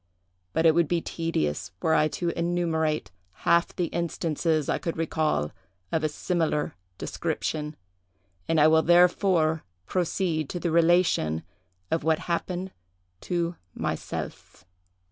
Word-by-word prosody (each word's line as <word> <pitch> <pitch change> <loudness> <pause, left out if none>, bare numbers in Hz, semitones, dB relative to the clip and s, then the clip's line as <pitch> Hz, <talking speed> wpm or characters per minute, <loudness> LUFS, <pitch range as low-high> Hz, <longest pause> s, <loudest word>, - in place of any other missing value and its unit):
But 160 - +2
it 160 - +7
would 170 -1 +3
be 175 +2 +1
tedious 90 - -2
were 160 - +2
I 155 - +4
to 170 +3 -2
enumerate 165 - 0 0.3
half 170 0 +3
the 180 - 0
instances 165 -2 0
I - - 0
could 165 - -3
recall 155 - 0 0.4
of 160 - 0
a 155 - +2
similar 160 -1 -1 0.2
description; 150 -1 -3 0.7
and 165 -1 +2
I 150 - +7
will 160 0 +5
therefore 175 -2 +4 0.2
proceed 170 - -1
to 175 - -3
the 170 -1 -1
relation 165 - +3 0.5
of 160 - +1
what 160 0 +3
happened 180 +2 -2 0.5
to 170 - -2 0.2
myself. - - -5
165 Hz, 125 wpm, -27 LUFS, 155-175 Hz, 0.7 s, it